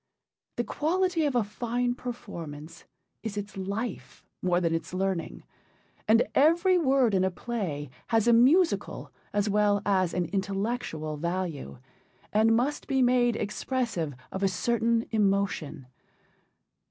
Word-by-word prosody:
The - - 0
quality 355 +1 0
of 280 -3 0
a 240 - +3
fine 240 +3 -1
performance 170 -11 -8 0.4
is 215 -2 -5
its 205 +1 -5
life 200 +3 -5 0.2
more 180 -1 +2
than 170 -2 0
its 165 +2 -3
learning, 190 -3 -2 0.6
and 225 +2 +5
every 335 +6 +4
word 265 -7 +3
in 190 -1 +3
a 190 - +2
play 175 - -4 0.2
has 225 0 +2
a 235 - +6
musical 300 +10 +3 0.2
as 205 0 0
well 205 0 +3
as 185 -3 +1
an 180 -1 +1
intellectual 195 -6 -2
value, 170 - -3 0.6
and 220 +2 +4
must 270 +6 -1
be 265 -2 +2
made 245 -1 +3
expressive 210 - -2 0.2
of 190 - -4
a 195 - +3
certain 230 +4 +1
emotion. 195 - 0
210 Hz, 130 wpm, -28 LUFS, 185-245 Hz, 0.6 s, a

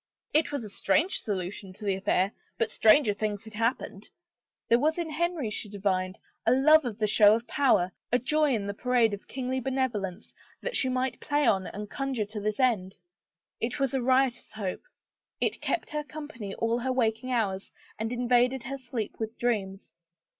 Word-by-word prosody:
It 310 -1 +3
was 285 -4 -3
a 210 - -7
strange 325 - +1
solution 190 -1 -4
to 210 +3 -10
the 200 - +2
affair 190 0 +1 0.3
but 230 - 0
stranger 220 0 +5
things 210 0 -3
had 220 -1 -12
happened. 220 -2 -2 0.6
There 235 - +5
was 310 +5 +2
in 335 -2 -3
Henry, 320 -7 -1
she 210 - -4
divined, 190 -2 -1 0.3
a 225 - +3
love 310 +3 +6
of 225 -4 -4
the 215 - +1
show 210 0 +6
of 230 +1 -4
power, 245 -11 +2 0.2
a 245 - +5
joy 295 +2 +2
in 205 -3 -2
the 200 - -3
parade 235 -1 +2
of 200 - -7
kingly 260 0 -2
benevolence, 230 -7 -2 0.3
that - - -3
she 260 - +2
might 255 0 -1
play 290 0 +1
on 190 -2 +2
and 210 +1 -6
conjure 265 -2 -2
to 210 +1 -6
this 210 +2 -2
end. 215 -8 +1 0.6
It 235 +5 -2
was 275 -1 +1
a 265 - +1
riotous 255 0 +1
hope. 200 -4 -4 0.6
It - - -1
kept 345 - -2
her 300 0 -2
company 290 -10 -7
all 230 +1 0
her 260 +2 -1
waking 240 0 0
hours 200 -5 -1 0.3
and 225 +1 -2
invaded 245 +1 +2
her 270 +2 -5
sleep 240 -4 -5
with 220 0 -4
dreams. 200 -5 -2
235 Hz, 185 wpm, -28 LUFS, 205-265 Hz, 0.6 s, love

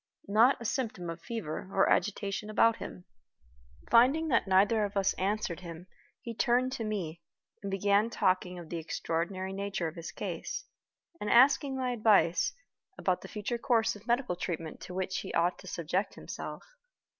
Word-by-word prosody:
Not 225 +7 +5
a 235 - -8
symptom 215 -8 -2
of 165 0 -9
fever 195 -6 -5
or 195 - +3
agitation 205 +1 0
about 230 +1 +4
him. 90 -1 -8 0.9
Finding 275 +7 +5
that 230 -6 +2
neither 200 +3 +4
of 205 0 -2
us 195 -1 +2
answered 195 -3 -1
him, 170 -1 -9 0.4
he 235 -3 -6
turned 250 +2 +2
to 235 - -3
me, 180 -7 -3 0.4
and 200 - -4
began 200 +3 +2
talking 185 -4 +1
of 170 -2 -9
the 170 - -3
extraordinary 175 +4 -3
nature 200 -3 -2
of 160 - -5
his 170 -1 -7
case, - - -5 0.5
and 210 - -3
asking 265 +2 +5
my 255 -1 -1
advice 210 -7 +3 0.5
about 185 -1 0
the - - -9
future 220 +3 -3
course 230 -3 +2
of 210 +3 -14
medical 240 -5 +1
treatment 165 -3 -5
to 180 - -8
which 190 0 -1
he - - -6
ought 175 +2 +2
to - - -12
subject 175 +4 -2
himself. - - -7
200 Hz, 170 wpm, -30 LUFS, 180-230 Hz, 0.9 s, Not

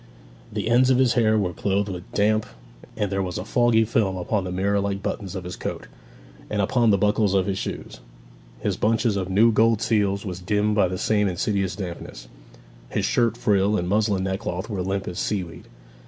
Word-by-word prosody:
The - - -3
ends 125 +2 +4
of 130 - +4
his 130 -3 +3
hair 110 -3 +3
were 90 -4 0
clotted 100 +2 -1
with 90 0 -9
damp, 110 +1 +1 0.5
and 105 -3 -1
there 95 0 0
was 90 -2 -3
a - - -5
foggy 120 -2 +3
film 105 -4 0
upon 95 +2 -1
the 90 - -4
mirror 100 +2 +1
like 100 0 -2
buttons 100 -3 -4
of 95 - -5
his 90 0 -6
coat, - - -5 0.6
and 105 - -2
upon 115 +4 +2
the 100 - +4
buckles 105 0 +2
of 95 -1 +2
his 95 -1 -2
shoes. - - -6 0.6
His - - -1
bunch 115 +3 +1
of 100 -5 0
new 110 +5 +4
gold 115 0 +3
seals 105 -3 0
was 90 -2 -5
dimmed 105 +3 0
by 105 -3 +3
the 90 +1 -4
same 105 +1 +1
insidious 95 +1 -1
dampness; 85 - -7 0.6
his - - -1
shirt 115 -2 +1
frill 105 -3 +2
and 90 - -2
muslin 105 -1 +1
neckcloth 95 +1 -3
were 100 -3 -2
limp 95 +1 -2
as 90 - -4
seaweed. 90 -5 -3
100 Hz, 200 wpm, -24 LUFS, 95-110 Hz, 0.6 s, ends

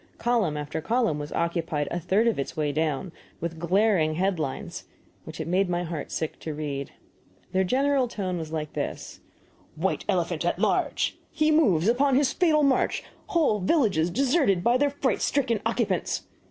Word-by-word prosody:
Column 225 -11 +1
after 150 +1 -4
column 225 -5 +1
was 145 +1 -6
occupied, 165 -3 -1
a 175 - -1
third 195 +7 +2
of 230 -9 +1
its 140 - -4
way 150 -2 0
down, 155 +3 -1 0.3
with 165 -1 -4
glaring 175 -2 +2
head 185 0 0
lines, 140 -4 -4 0.4
which - - -9
it - - -3
made 185 +2 +2
my 175 0 0
heart 165 -3 -5
sick 160 - -3
to 155 -2 -5
read. 140 -2 -4 0.6
Their 190 0 +2
general 265 +5 +2
tone 185 -6 -3
was 160 -1 -6
like 155 -2 -4
this: - - -5 0.6
THE - - -7
WHITE - - 0
ELEPHANT - - 0
AT - - 0
LARGE! - - 0
HE 310 0 +1
MOVES 200 - +3
UPON 265 +3 +3
HIS 270 -1 +3
FATAL 315 -4 +3
MARCH! 275 -2 +2 0.2
WHOLE 310 -11 +2
VILLAGES 190 - +2
DESERTED 250 - +2
BY 240 +4 +4
THEIR 285 +2 +2
FRIGHT 280 -2 -1
STRICKEN 235 -6 +1
OCCUPANTS! - - -1
185 Hz, 175 wpm, -26 LUFS, 160-255 Hz, 0.6 s, BY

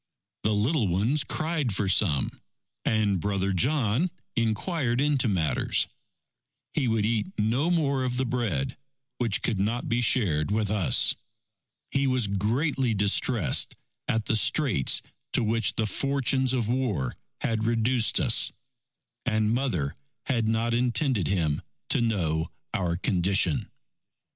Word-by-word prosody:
The 110 - +1
little 115 +3 +1
ones 110 - +1
cried 155 - -1
for 100 0 -1
some, 90 -7 +1 0.4
and 105 -4 +1
Brother 100 +1 -1
John 130 - +1 0.3
inquired 120 - 0
into 140 -3 +1
matters. 85 -7 +1 0.9
He 130 - 0
would 110 -2 +1
eat 115 - -1
no 120 +10 +1
more 140 -6 +1
of 125 -1 -2
the 130 - 0
bread, 115 - -2 0.4
which 115 -5 0
could 110 -5 0
not 115 +5 -1
be 120 +1 0
shared 100 - +2
with 105 -1 0
us. 105 -5 +4 0.8
He 135 0 +1
was 130 -3 +1
greatly 115 - 0
distressed 100 - +2 0.3
at 110 -1 0
the - - 0
straits 125 - +3 0.3
to - - +3
which 115 -2 0
the 110 - 0
fortunes 135 +2 0
of 125 -4 0
war 115 - -1 0.3
had 110 -1 -1
reduced 115 +1 +2
us. 120 -4 +4 0.7
And 110 -2 +1
Mother 115 - -1 0.3
had 115 -5 0
not 115 +1 0
intended 120 - +1
him 80 -7 0 0.3
to - - +3
know 85 -8 0 0.2
our 85 -3 -1
condition. 90 -2 +1
115 Hz, 130 wpm, -26 LUFS, 100-130 Hz, 0.9 s, us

